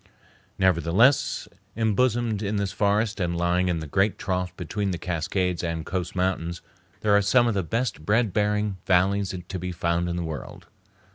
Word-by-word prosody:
Nevertheless, 95 - +3 0.3
embosomed 115 -1 +1
in 105 0 -1
this 100 -2 -1
forest 105 +2 +1
and 85 -2 -1
lying 90 +1 +1
in 85 -2 0
the - - -5
great 95 +7 +1
trough 90 -1 -2
between 100 +3 -2
the 90 - -2
Cascades 90 +1 -1
and 85 -2 -3
coast 90 -1 -3
mountains, 90 -2 -1 0.4
there 105 -1 +3
are 100 - +5
some 120 +5 +4
of 115 - +1
the 100 - 0
best 110 -1 -2
bread 110 +2 +2
bearing 105 -1 0
valleys 95 +1 +2
to 95 - -4
be 90 +1 -4
found 85 0 0
in 85 - -2
the 85 - -2
world. 80 -3 -7
95 Hz, 170 wpm, -25 LUFS, 85-105 Hz, 0.4 s, are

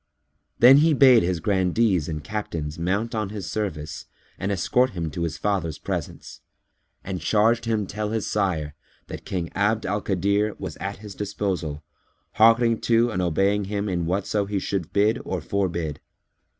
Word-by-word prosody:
Then 130 +3 +8
he 155 +1 +4
bade 130 -4 +7
his 90 -1 -1
Grandees 95 -1 +1
and 75 -2 -4
Captains 85 -6 -4
mount 100 +7 -1
on 110 -3 -2
his 100 -4 -6
service 80 -8 -4 0.3
and 95 +2 -2
escort 125 +7 +2
him 80 -2 -2
to 85 - -5
his 85 -2 -2
father's 95 -7 -1
presence; - - -6 0.6
and 95 -3 -5
charged 110 +6 +2
him 110 -3 0
tell 105 +2 -4
his 110 -1 -2
sire 85 -8 -1 0.4
that - - -8
King 85 -3 -3
Abd 105 +2 +1
al 100 +2 -1
Kadir 100 +3 0
was - - -6
at 100 +1 -5
his 105 - -8
disposal, 95 -7 -3 0.5
hearkening 115 +1 +4
to 115 +1 +3
and 90 - -1
obeying 95 +4 +1
him 100 +1 -2
in 90 -3 -1
whatso 100 +2 -1
he 100 0 -2
should 95 -3 -3
bid 110 +5 +2
or 95 - -3
forbid. 85 -4 -2
100 Hz, 165 wpm, -24 LUFS, 85-110 Hz, 0.6 s, Then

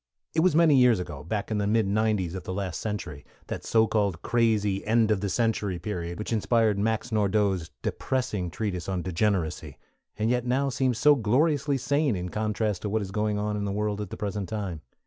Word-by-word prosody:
It 160 - +1
was 175 -1 +3
many 160 -4 +5
years 125 -5 +5
ago 75 -5 -6
back 105 +6 -3
in 105 - 0
the 100 - 0
mid 110 0 +2
'90's 105 -4 +1
of 95 - -4
the 95 - -5
last 95 -3 -3
century, 105 -9 -5 0.2
that - - -5
so 110 -1 +3
called 100 -6 0
crazy 105 -4 +1
end 110 0 +3
of 100 -3 +1
the 100 - -1
century 105 -3 0
period, 85 -1 -4
which 105 - -3
inspired 110 -1 +2
Max 110 +3 -1
Nordau's 100 -5 +1
depressing 105 -9 -2
treatise 90 -1 -3
on 90 -2 -2
Degeneracy, 95 -2 -1 0.4
and 110 +2 +1
yet 125 -1 +1
now 130 +3 +1
seems 130 -2 0
so 150 +4 +6
gloriously 140 +4 +2
sane 140 -1 +1
in 90 0 -4
contrast 105 -1 -1
to 105 - -3
what 110 +1 0
is 95 - -7
going 105 0 0
on 105 0 -1
in 105 - -2
the 100 - -2
world 105 0 -1
at 105 - -5
the - - -7
present 105 -2 -3
time. 100 -7 -4
105 Hz, 205 wpm, -27 LUFS, 95-115 Hz, 0.4 s, so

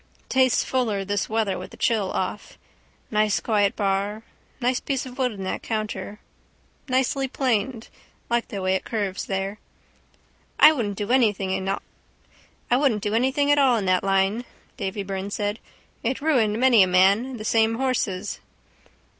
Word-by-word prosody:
Tastes 260 -1 +3
fuller 220 -7 -1
this 205 0 -1
weather 215 -4 0
with 185 - -8
the - - -14
chill 215 -6 +1
off. 190 +2 -4 0.5
Nice 215 -1 +2
quiet 205 -3 +1
bar. 200 +2 -1 0.4
Nice 250 0 +1
piece 270 -2 -2
of 255 +1 -10
wood 255 -2 +1
in 200 -3 -7
that 190 - -3
counter. 215 -1 -4 0.7
Nicely 265 +1 +1
planed. 245 -3 -1 0.4
Like 235 0 0
the 200 -3 -5
way 185 0 +2
it 190 - -1
curves 205 -5 -3
there. 195 +2 -3 1.0
—I 305 - +9
wouldn't 215 -9 -2
do 205 +3 -3
anything 210 -7 +2
at 195 +1 -1 1.8
all 260 -3 +4
in 205 - -2
that 185 -1 +2
line, 195 +4 +1 0.3
Davy 195 +1 -3
Byrne 195 0 -4
said. 205 +1 -2 0.4
It 250 +3 -1
ruined 235 -8 +2
many 250 -4 +6
a 185 - +5
man, 200 +8 +3
the 215 - -7
same 225 0 +2
horses. 225 -6 -2
215 Hz, 145 wpm, -24 LUFS, 195-245 Hz, 1.8 s, I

